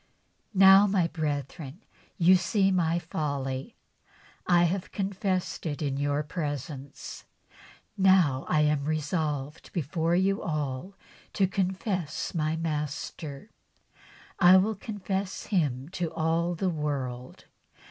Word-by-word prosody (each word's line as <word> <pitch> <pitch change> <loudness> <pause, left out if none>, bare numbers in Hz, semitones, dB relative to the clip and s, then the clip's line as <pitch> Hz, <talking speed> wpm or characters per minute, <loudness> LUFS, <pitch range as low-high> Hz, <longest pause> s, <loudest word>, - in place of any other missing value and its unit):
" - - -43
Now, 195 +1 +8
my 190 -3 +2
brethren, 150 - -4 0.3
you 180 0 +6
see 195 +2 +2
my 170 -2 +2
folly. 140 -5 -3 0.7
I 175 -1 +5
have 180 +2 -1
confessed 190 -2 -2
it 145 -2 -3
in 140 -3 -1
your 145 +1 0
presence, 145 -3 -6 0.7
and 195 - +1
now 170 -9 +4
I 155 - +3
am 150 -2 +1
resolved 150 -1 -2
before 165 +1 0
you 195 +2 +2
all 150 +4 -3 0.4
to 195 - +3
confess 185 -3 -2
my 155 -2 0
Master. 150 +1 -4 0.9
I 180 +1 +8
will 205 +4 +2
confess 195 -2 -4
Him 145 - 0
to 175 -3 -3
all 165 +2 0
the 185 +2 0
world. 135 -5 -4
165 Hz, 115 wpm, -28 LUFS, 145-190 Hz, 0.9 s, Now